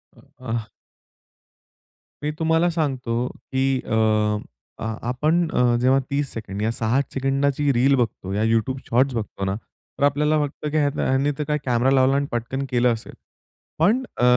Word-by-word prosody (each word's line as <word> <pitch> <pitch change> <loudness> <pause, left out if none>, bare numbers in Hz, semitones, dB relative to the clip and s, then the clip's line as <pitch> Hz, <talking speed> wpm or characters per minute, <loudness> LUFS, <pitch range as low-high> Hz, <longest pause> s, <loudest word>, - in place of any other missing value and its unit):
अ, - - -19 0.2
हां. 115 -2 -2 1.6
मी 150 - 0
तुम्हाला 165 +2 +3
सांगतो, 130 -7 -1
की 130 0 -1
अ, - - -3 0.9
आ - - -2 0.2
आपण 155 +7 +1
अ, 120 -1 +3
जेव्हा 130 +2 +4
30 140 0 -1
सेकंड 105 -2 -6
या 110 +1 +1
6-8 120 +4 0
सेकंडाची 140 +1 +1
रील 130 +3 +4
बघतो, 105 -6 -2
या 105 +2 0
YouTube 115 +4 +1
शॉट्स 130 +2 +3
बघतो 105 -3 -3
ना, 95 +1 -1
तर 115 - -10
आपल्याला 150 +2 +3
वाटतं 150 0 -2
की 155 - +1
हयानं 145 -1 +1
ह्यांनी 135 +2 +2
तर 150 - -1
काय 150 -1 +1
कॅमेरा 125 +1 +2
लावला 130 +1 +4
आणि 140 - +1
पटकन 120 +4 -2
केलं 125 -1 +3
असेल. 110 - -8 0.7
पण 215 +11 +3
अ, - - 0
135 Hz, 165 wpm, -23 LUFS, 120-145 Hz, 1.6 s, जेव्हा